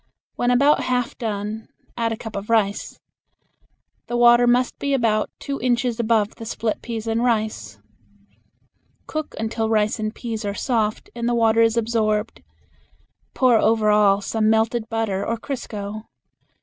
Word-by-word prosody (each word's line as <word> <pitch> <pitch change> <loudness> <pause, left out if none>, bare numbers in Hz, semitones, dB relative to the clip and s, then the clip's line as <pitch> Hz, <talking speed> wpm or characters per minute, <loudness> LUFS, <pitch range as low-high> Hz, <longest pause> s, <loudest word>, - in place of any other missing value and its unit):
When 245 - 0
about 280 +4 +3
half 250 -1 -1
done 215 -1 -4 0.3
add 230 -1 -1
a 225 - -3
cup 225 -1 -8
of 200 +2 -5
rice. 205 -3 0 1.1
The 240 - -2
water 240 0 +6
must 245 +1 +2
be 280 -1 0
about 220 -4 +1
two 275 0 -5
inches 245 -1 0
above 220 -2 +1
the 225 - -8
split 225 -1 -2
peas 230 -2 -5
and 225 +1 0
rice. 215 - -1 1.3
Cook 310 -1 -5
until 220 0 -2
rice 215 -1 +1
and 215 0 -2
peas 225 -2 -5
are 200 -1 -3
soft 220 -4 -1
and 235 0 -2
the 240 - +1
water 225 -1 +3
is 225 0 +3
absorbed. 220 -1 0 0.9
Pour 250 -4 +4
over 220 -1 +3
all 205 -1 +4
some 215 +1 0
melted 220 +1 +1
butter 220 -4 -1
or 230 +3 -2
crisco. 215 -4 -6
225 Hz, 150 wpm, -22 LUFS, 215-240 Hz, 1.3 s, water